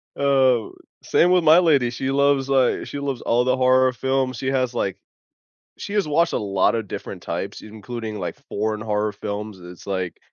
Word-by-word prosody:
Oh, 130 -4 +2 0.3
same 175 +2 +3
with 180 -2 +4
my 160 +3 +7
lady. 145 -8 +3
She 130 +2 -3
loves, 140 -1 +2
li 130 -2 +2
she 145 - -6
loves 140 -3 -3
all 120 +1 +2
the 130 - +2
horror 130 0 +4
films. 130 -1 -1
She 130 - -4
has, 130 -2 0
like 100 -5 -2 0.8
She 200 - -7
has 205 -5 +1
watched 165 +3 +2
a - - +1
lotta 100 +2 +1
different 100 - -7
types, - - -5
including, 110 0 -7
like, 90 - -5
foreign 110 +1 -2
horror 105 0 -1
films, 105 -1 -6
it's 90 +2 -12
like 95 -3 -3
125 Hz, 180 wpm, -22 LUFS, 105-135 Hz, 0.8 s, my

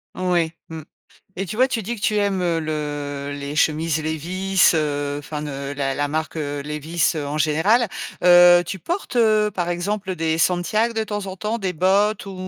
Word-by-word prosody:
Ouais, 175 -3 0 0.2
mmh. 160 -1 -7 0.6
Et 195 - -2
tu 190 - -6
vois, 255 +2 +4
tu 230 - -1
dis 235 +5 -3
que 210 - -12
tu 215 - +1
aimes, 200 -2 0
heu, 170 -2 0
le 145 -2 -4
les 140 +1 -6
chemises 155 0 +1
Levi's, 180 +5 +1
heu, 145 -2 -1
enfin, 150 0 -6
ne 150 - -5 0.2
heu, - - -4
la 135 -1 -2
la 145 +1 0
marque, 155 +2 -3
heu, 145 -2 -3
Levi's, 150 +3 -1
heu, 150 -2 -3
en 145 +2 -3
général. 160 +11 +2 0.4
Heu, 175 0 +8
tu 190 - -5
portes, 345 - -4
heu, 215 -2 +3
par 175 -3 -2
exemple, 190 +3 -3
heu, - - -4
des 160 0 0
santiags, 185 +7 +1
de 220 -1 -1
temps 205 -2 -4
en 190 0 -7
temps? 215 +4 -2
Des 190 -3 -1
bottes, 195 +6 +2
ou 195 - -7
175 Hz, 205 wpm, -22 LUFS, 150-200 Hz, 0.6 s, Heu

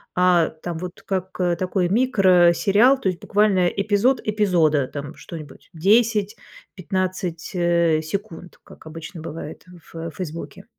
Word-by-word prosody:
а 180 -2 +3
там 160 +1 -7
вот 180 +1 -8
как 190 -1 -2 0.3
такой 185 0 0
микросериал, 195 +1 +4
то 235 - -2
есть 185 -2 -2
буквально 200 -3 +2
эпизод 205 +7 +1
эпизода, 175 -10 +2
там 145 +1 -7
что-нибудь 155 -5 -11
10-15, 190 -3 -1
э, 170 -2 +2
секунд, 180 +1 -7
как - - -16
обычно 165 +2 -9
бывает 155 -1 -8
в 165 -2 -9
в - - -12
"Фейсбуке". 165 0 -7
180 Hz, 120 wpm, -22 LUFS, 165-200 Hz, 0.3 s, микросериал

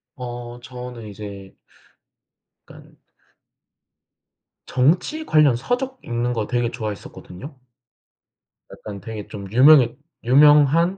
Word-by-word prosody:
어 120 -1 -8
저는 125 0 -9
이제 100 -2 -10 1.1
약간 - - -16 1.7
정치 175 - 0
관련 150 - +4
서적 255 - -3
읽는 120 +1 -2
거 110 -3 -3
되게 120 -1 -1
좋아했었거든요. 110 - -8 1.2
약간 100 -2 -9
되게 105 0 -8
좀 100 -2 -9
유명했 130 +2 +6 0.3
유명한 150 +7 +5
125 Hz, 195 characters per minute, -21 LUFS, 110-150 Hz, 1.7 s, 유명했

